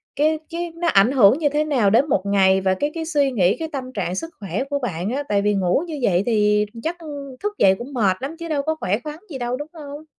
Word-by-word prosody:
cái 310 +2 +2
cái 340 0 -4
nó 340 +1 -2
ảnh 205 -4 +4
hưởng 245 -3 +5
như 300 -3 +2
thế 295 +2 +1
nào 265 -9 +2
đến 250 +9 +3
một 195 - +2
ngày 190 -1 +3
và 190 0 +2
cái 290 +11 -2
cái 325 -1 -4
suy 290 -4 +1
nghĩ, 195 -5 +2
cái 325 - -4
tâm 255 -2 -6
trạng 185 -4 -2
sức 330 +12 -4
khỏe 210 +5 -3
của 285 -1 -1
bạn 190 -7 -3
á? 275 +4 -2
Tại 200 -1 +2
vì 210 +1 +2
ngủ 190 - +1
như 310 -3 -5
vậy 190 -5 +2
thì 210 -2 +2 0.2
chắc 330 +2 -2 0.5
thức 415 0 -2
dậy 190 -1 +5
cũng 265 +4 -8
mệt 200 -7 +2
lắm 275 +5 -5
chứ 335 - -5
đâu 295 -3 0
có 315 +2 -1
khỏe 200 -1 0
khoắn 300 +1 -7
gì 280 - -5
đâu, 245 0 -2
đúng 295 +2 -6
không? 295 -1 -9
255 Hz, 265 wpm, -21 LUFS, 200-300 Hz, 0.5 s, hưởng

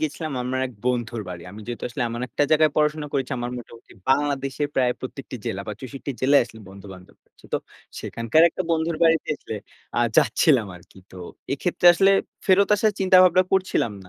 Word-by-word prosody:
গিয়েছিলাম 155 0 -3
আমার 130 +1 -2
এক 125 - -11
বন্ধুর 120 -3 -1
বাড়ি। 85 -2 -7
আমি 105 +2 -10
যেহেতু 120 -1 -6
আসলে 125 +2 -4
এমন 120 +1 -5
একটা 125 - -1
জায়গায় 155 0 +4
পড়াশোনা 150 0 +1
করেছি, 135 -2 -2
আমার 120 0 -3
মোটামুটি 115 -1 -14 0.2
বাংলাদেশের 140 0 0
প্রায় 125 -2 +2
প্রত্যেকটি 130 0 -7
জেলা, 95 - -3
বা 105 - -4
৬৪ 135 +2 -7
জেলায় 140 +2 +5
আসলে 115 -1 -14
বন্ধু-বান্ধব 95 -1 -13
আছে। - - -28
তো - - +2 0.4
সেখানকার 115 +7 +1
একটা 185 - -4
বন্ধুর 165 0 0
বাড়িতে 165 -1 +3
আসলে - - -8 0.4
আ - - +2 0.2
যাচ্ছিলাম 125 0 +3
আরকি। 90 +2 -18
তো - - -13 0.4
এক্ষেত্রে 175 +5 0
আসলে 195 +2 +4 0.4
ফেরত 195 +1 +4
আসার 215 +1 +2
চিন্তা 190 -1 +5
ভাবনা 185 0 +5
করছিলাম 185 - +1
না। - - -16
135 Hz, 185 wpm, -23 LUFS, 115-160 Hz, 0.4 s, জেলায়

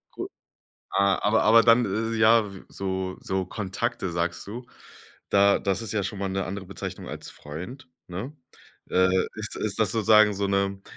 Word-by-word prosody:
Cool. - - -5 0.6
Ah, 100 -1 +2
aber 110 +2 +3
aber 115 +2 +7
dann 115 +1 +5
isses 110 +3 -2
ja, 110 -2 +4
w 95 - -11
so 95 -1 -4
so 95 0 -2
Kontakte 95 -1 -3
sagst 85 0 -2
du 120 +4 -7 0.6
da 100 0 +4
das 100 +2 -1
ist 115 -1 -5
ja 105 -2 0
schon 100 +1 -5
mal 100 -1 -2
'ne 95 0 -2
andere 95 0 -5
Bezeichnung 100 - -7
als - - -7
Freund, 90 - -9 0.2
ne? 100 +12 -6 0.5
Äh, 95 0 +4 0.3
ist 105 -2 -5
ist 110 0 -3
das 110 - +2
sozusagen 110 -2 +5
so 100 0 -1
'ne 100 0 0
100 Hz, 175 wpm, -26 LUFS, 95-110 Hz, 0.6 s, aber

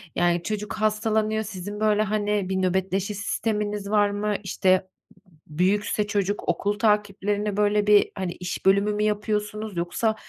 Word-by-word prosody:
yani 175 0 +2
çocuk 210 -1 -3
hastalanıyor. 215 0 0
Sizin 205 +1 -6
böyle, 215 -1 +3
hani, 210 -2 -1
bir 190 0 0
nöbetleşe 190 +2 0
sisteminiz 210 0 -2
var 205 -1 +3
mı? 205 0 -1
İşte 185 -1 +2 0.6
b 155 +2 -11
büyükse 205 +2 +1
çocuk; 205 -2 -1
okul 200 +4 0
takiplerini 210 -1 0
böyle 210 0 +2
bir 210 -1 +5
hani 185 -2 -2
iş 180 +1 -6
bölümü 200 +2 +4
mü 210 0 -1
yapıyorsunuz, 210 -1 -2
yoksa 215 +6 0
205 Hz, 145 wpm, -25 LUFS, 195-210 Hz, 0.6 s, bir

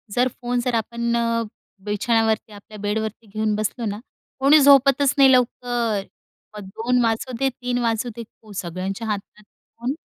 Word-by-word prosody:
जर 250 +1 +3
फोन 245 0 -1
जर 250 - 0
आपण 235 +1 -1 0.7
बिछाण्यावरती 220 +1 0
आपल्या 205 +1 -12
बेडवरती 220 +2 -3
घेऊन 215 +1 -1
बसलो 215 +3 -2
ना, 205 -1 -3 0.4
कोणी 280 +3 +6
झोपतच 275 0 +5
नाही 270 -1 +7
लवकर. 240 -4 +1 0.5
मग 205 - -7
2:00 245 +2 +1
वाजू 225 +3 -1
दे, 270 - +2
3:00 250 -1 -3
वाजू 230 0 0
दे. 235 - -6 0.2
हो, 215 - -14
सगळ्यांच्या 190 +5 -5
हातात 210 0 -5
फोन. 240 +5 -7
230 Hz, 150 wpm, -22 LUFS, 215-250 Hz, 0.7 s, नाही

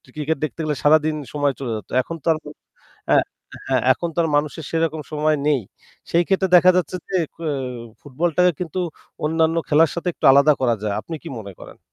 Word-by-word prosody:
Cricket 155 +1 -1
দেখতে 155 0 -4
গেলে 150 -1 -1
সারাদিন 155 +1 +4 0.2
সময় 145 -2 +1
চলে 125 -4 -4
যেত। 105 - -7
এখন 165 +6 -7
তো - - -8
আর 155 - -4 0.7
এ্যা - - +6 0.5
হ্যাঁ, 130 -3 +1
এখন 170 +6 -4
তো - - -8
আর 165 - 0
মানুষের 150 +1 -2
সেরকম 165 -1 -1
সময় 155 0 +1
নেই। 145 -3 +3 0.5
সেই 170 - +3
ক্ষেত্রে 190 -1 +1
দেখা 180 +1 +7
যাচ্ছে 180 0 -1
যে 190 - -1 0.2
কেও 165 -2 -3 0.5
ফুটবলটাকে 175 +5 +1
কিন্তু 180 0 -4 0.5
অন্যান্য 160 +1 +1
খেলার 155 +1 +4
সাথে 170 +1 -3
একটু - - -12
আলাদা 140 +2 +6
করা 120 -3 +2
যায়। 105 -1 -1
আপনি 165 - -8
কি 165 - -6
মনে 100 -2 -9
করেন? - - -12
155 Hz, 190 wpm, -21 LUFS, 145-165 Hz, 0.7 s, দেখা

